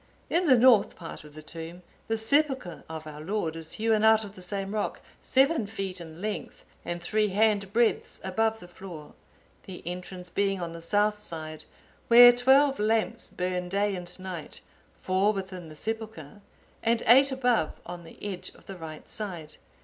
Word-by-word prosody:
In 345 +1 +2
the 260 -3 +7
north 240 -3 +5
part 165 -3 -9
of 150 -1 -15
the 155 - -10
tomb 165 +3 -8 0.2
the 225 - 0
sepulchre 260 - +1
of 160 -1 -6
our 150 -1 -8
Lord 170 -2 -2
is 165 -1 -7
hewn 220 -1 +1
out 220 0 +6
of 200 - -10
the 185 - -11
same 195 +2 -4
rock, 210 -1 -2 0.2
seven 270 -3 +2
feet 195 -3 -5
in 160 -1 -10
length, 215 -1 -5 0.2
and 175 0 -4
three 215 +3 +1
hand 205 -1 +2
breadths 230 +1 +1
above 220 +4 0
the 175 - -12
floor; 175 -4 -10 0.5
the 185 -2 -8
entrance 180 0 -7
being 195 0 0
on 170 -1 -4
the 165 - -8
south 210 +4 +1
side, 155 -5 -4 0.4
where 245 +1 +10
twelve 265 +3 +4
lamps 225 +2 0
burn 180 0 -3
day 200 +1 +1
and 180 0 -7
night, 185 -4 -7 0.4
four 190 +3 +2
within 190 -4 -6
the 155 - -11
sepulchre, 215 -3 -6 0.4
and 230 0 +1
eight 270 +4 +7
above 245 -10 +1
on 175 0 -7
the 165 - -14
edge 195 -3 -4
of - - -19
the 195 - -8
right 160 -2 -9
side. 175 -8 -6
195 Hz, 175 wpm, -28 LUFS, 175-220 Hz, 0.5 s, where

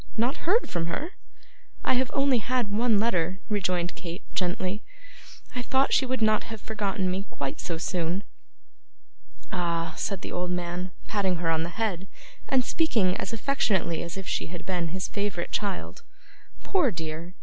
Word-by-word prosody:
Not 245 +8 +1
heard 450 +6 +5
from 165 -1 -1
her?' 305 - -2 0.7
'I - - +5
have 255 0 +2
only 275 -3 +4
had 240 -1 0
one 220 +1 +4
letter,' 190 -4 +2
rejoined 180 -4 +1
Kate, 175 +1 -6
gently. 185 +2 0 0.7
'I 250 - 0
thought 265 +2 +3
she 265 - +5
would 255 -2 +1
not 215 0 +4
have 225 -1 -6
forgotten 200 -3 -1
me 195 +3 -2
quite 140 -1 -3
so 170 -2 -2
soon.' 175 +2 0 1.3
'Ah,' 170 -2 0
said 195 -3 -1
the - - -5
old 180 0 -1
man, 180 +1 -2 0.2
patting 195 -3 +2
her 165 -1 +1
on 160 0 +2
the 165 - -1
head, 195 -5 0 0.4
and 260 -2 +4
speaking 220 - +3
as - - -3
affectionately 215 - +1
as 170 +2 -5
if 195 - -5
she - - 0
had 175 0 -7
been 180 -3 0
his 185 +3 -2
favourite 200 -4 -2
child. 200 -3 -2 0.6
'Poor 360 -9 +3
dear! 165 -1 -5
190 Hz, 165 wpm, -28 LUFS, 175-225 Hz, 1.3 s, heard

